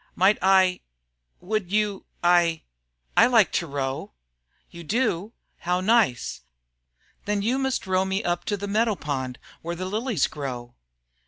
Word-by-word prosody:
"Might 195 Hz, +3 st, +4 dB
I 190 Hz, -1 st, +4 dB, 0.6 s
would 200 Hz, -1 st, -2 dB
you 210 Hz, -1 st, 0 dB, 0.2 s
I 175 Hz, -2 st, +3 dB, 0.5 s
I -, -, +7 dB
like 225 Hz, -8 st, +4 dB
to 170 Hz, -, -1 dB
row." 135 Hz, -2 st, -4 dB, 0.6 s
"You 170 Hz, -, -10 dB
do? 215 Hz, +1 st, -1 dB, 0.3 s
How 180 Hz, +1 st, 0 dB
nice! 190 Hz, -, +1 dB, 0.8 s
Then 205 Hz, -1 st, -1 dB
you 250 Hz, +5 st, +1 dB
must 265 Hz, -4 st, -1 dB
row 185 Hz, 0 st, +2 dB
me 190 Hz, +1 st, -1 dB
up 175 Hz, 0 st, -1 dB
to 205 Hz, -, -1 dB
the 205 Hz, +1 st, -5 dB
meadow 215 Hz, +1 st, +1 dB
pond 130 Hz, -6 st, -4 dB, 0.2 s
where 170 Hz, +1 st, -4 dB
the 185 Hz, +2 st, -4 dB
lilies 215 Hz, -, 0 dB
grow." 125 Hz, -4 st, -6 dB
185 Hz, 145 wpm, -25 LUFS, 165-210 Hz, 0.8 s, I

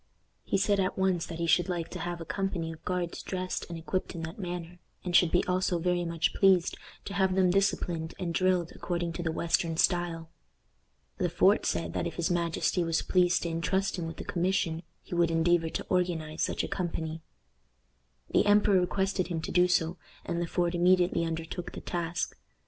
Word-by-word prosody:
He -, -, 0 dB
said 200 Hz, +1 st, +2 dB
at 185 Hz, 0 st, 0 dB
once 190 Hz, -3 st, +1 dB
that 165 Hz, -, -6 dB
he 170 Hz, -, -1 dB
should 175 Hz, +2 st, +3 dB
like 175 Hz, -2 st, -2 dB
to -, -, -7 dB
have 175 Hz, 0 st, -4 dB
a 165 Hz, -, -6 dB
company 180 Hz, -3 st, -2 dB
of 160 Hz, 0 st, -12 dB
guards 180 Hz, -2 st, -2 dB
dressed 185 Hz, -1 st, -4 dB
and 170 Hz, -, -5 dB
equipped 180 Hz, +3 st, -3 dB
in 165 Hz, -, -5 dB
that 160 Hz, +5 st, -7 dB
manner, 175 Hz, -1 st, -5 dB, 0.2 s
and 180 Hz, -1 st, -2 dB
should 175 Hz, -, +6 dB
be 175 Hz, -, +2 dB
also 180 Hz, -1 st, +1 dB
very 175 Hz, +1 st, 0 dB
much 165 Hz, -1 st, 0 dB
pleased 190 Hz, -3 st, +4 dB, 0.3 s
to 200 Hz, -, -5 dB
have 190 Hz, -2 st, +2 dB
them 185 Hz, -2 st, +4 dB
disciplined 175 Hz, -4 st, 0 dB
and 175 Hz, -3 st, -3 dB
drilled 180 Hz, -1 st, +1 dB
according 175 Hz, -1 st, -2 dB
to 175 Hz, -, -4 dB
the 165 Hz, -2 st, -1 dB
western 165 Hz, 0 st, 0 dB
style. 170 Hz, -2 st, +1 dB, 0.9 s
Le -, -, +1 dB
Fort -, -, +3 dB
said 85 Hz, -1 st, -1 dB
that -, -, -1 dB
if 170 Hz, -, -6 dB
his 170 Hz, 0 st, 0 dB
majesty 170 Hz, +1 st, +1 dB
was 165 Hz, -1 st, 0 dB
pleased 180 Hz, -1 st, +3 dB
to 170 Hz, -, -2 dB
intrust 180 Hz, +4 st, 0 dB
him 165 Hz, -, -3 dB
with 165 Hz, -, -7 dB
the -, -, -6 dB
commission, 175 Hz, -2 st, 0 dB, 0.2 s
he -, -, -9 dB
would 170 Hz, -1 st, +3 dB
endeavor 165 Hz, 0 st, +2 dB
to -, -, -4 dB
organize 170 Hz, -4 st, -1 dB
such -, -, 0 dB
a -, -, -2 dB
company. 165 Hz, -3 st, -3 dB, 1.1 s
The -, -, +3 dB
emperor 205 Hz, -2 st, +5 dB
requested 190 Hz, 0 st, 0 dB
him 170 Hz, -2 st, -2 dB
to -, -, -5 dB
do 180 Hz, 0 st, +4 dB
so, 180 Hz, -1 st, +1 dB, 0.3 s
and 170 Hz, -1 st, -2 dB
Le 175 Hz, -, -1 dB
Port 175 Hz, 0 st, 0 dB
immediately 175 Hz, -1 st, +3 dB
undertook 165 Hz, +2 st, -5 dB
the -, -, -6 dB
task. 170 Hz, -1 st, -3 dB
175 Hz, 200 wpm, -29 LUFS, 165-185 Hz, 1.1 s, should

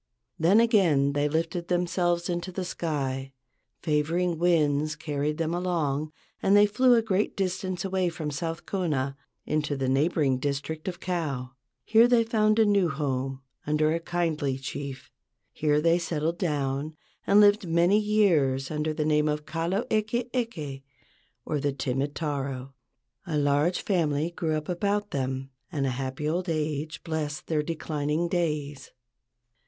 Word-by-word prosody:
Then 180 Hz, +7 st, +5 dB
again 175 Hz, -, +3 dB
they 145 Hz, +1 st, +1 dB
lifted 165 Hz, +2 st, -2 dB
themselves 175 Hz, -1 st, 0 dB
into 175 Hz, +1 st, -3 dB
the 185 Hz, 0 st, -4 dB
sky. 135 Hz, -6 st, -3 dB, 0.5 s
Favoring 165 Hz, +2 st, 0 dB
winds 155 Hz, -3 st, +2 dB
carried 150 Hz, 0 st, -2 dB
them 165 Hz, 0 st, -1 dB
along 155 Hz, -5 st, -1 dB, 0.3 s
and 200 Hz, +1 st, +5 dB
they 205 Hz, -, +7 dB
flew 245 Hz, +5 st, +4 dB
a 230 Hz, -, +3 dB
great 205 Hz, -1 st, 0 dB
distance 185 Hz, -1 st, -2 dB
away 190 Hz, -2 st, +1 dB
from 160 Hz, -3 st, -4 dB
South 165 Hz, +3 st, -4 dB
Kona 145 Hz, -8 st, -1 dB, 0.3 s
into 150 Hz, -2 st, -1 dB
the 135 Hz, -1 st, -1 dB
neighboring 135 Hz, -1 st, +2 dB
district 145 Hz, +4 st, -3 dB
of 180 Hz, -1 st, -4 dB
Kau. 145 Hz, -8 st, -3 dB, 0.3 s
Here 225 Hz, +2 st, +6 dB
they 240 Hz, -2 st, +4 dB
found 215 Hz, -1 st, +2 dB
a 225 Hz, -, +5 dB
new 200 Hz, -4 st, +3 dB
home 135 Hz, -2 st, -2 dB, 0.2 s
under 155 Hz, +1 st, +2 dB
a 165 Hz, -, 0 dB
kindly 160 Hz, -6 st, -1 dB
chief. 135 Hz, 0 st, -6 dB, 0.4 s
Here 150 Hz, -1 st, +2 dB
they 165 Hz, +2 st, +3 dB
settled 170 Hz, 0 st, -2 dB
down 145 Hz, -2 st, -1 dB, 0.3 s
and 200 Hz, +1 st, +6 dB
lived 205 Hz, -2 st, +5 dB
many 170 Hz, +5 st, +4 dB
years 165 Hz, -12 st, +2 dB
under 155 Hz, 0 st, -1 dB
the 150 Hz, -, -1 dB
name 150 Hz, 0 st, +2 dB
of 150 Hz, 0 st, -2 dB
Kalo 170 Hz, +6 st, -1 dB
eke 225 Hz, +3 st, 0 dB
eke, 160 Hz, -, -3 dB, 0.6 s
or 150 Hz, -, -1 dB
"The 140 Hz, 0 st, 0 dB
Timid 135 Hz, +1 st, -2 dB
Taro." 135 Hz, -4 st, -3 dB, 0.5 s
A 155 Hz, -3 st, -1 dB
large 145 Hz, +4 st, +2 dB
family 160 Hz, -4 st, 0 dB
grew 165 Hz, -2 st, -1 dB
up 155 Hz, -, -6 dB
about 205 Hz, +3 st, -1 dB
them 135 Hz, 0 st, -3 dB, 0.2 s
and 140 Hz, -3 st, -1 dB
a -, -, +1 dB
happy 130 Hz, +3 st, -3 dB
old 175 Hz, +3 st, -1 dB
age 155 Hz, -2 st, -2 dB
blessed 155 Hz, -2 st, -3 dB
their 155 Hz, -2 st, 0 dB
declining 155 Hz, 0 st, -2 dB
days. 150 Hz, -5 st, -2 dB
155 Hz, 150 wpm, -27 LUFS, 145-180 Hz, 0.6 s, they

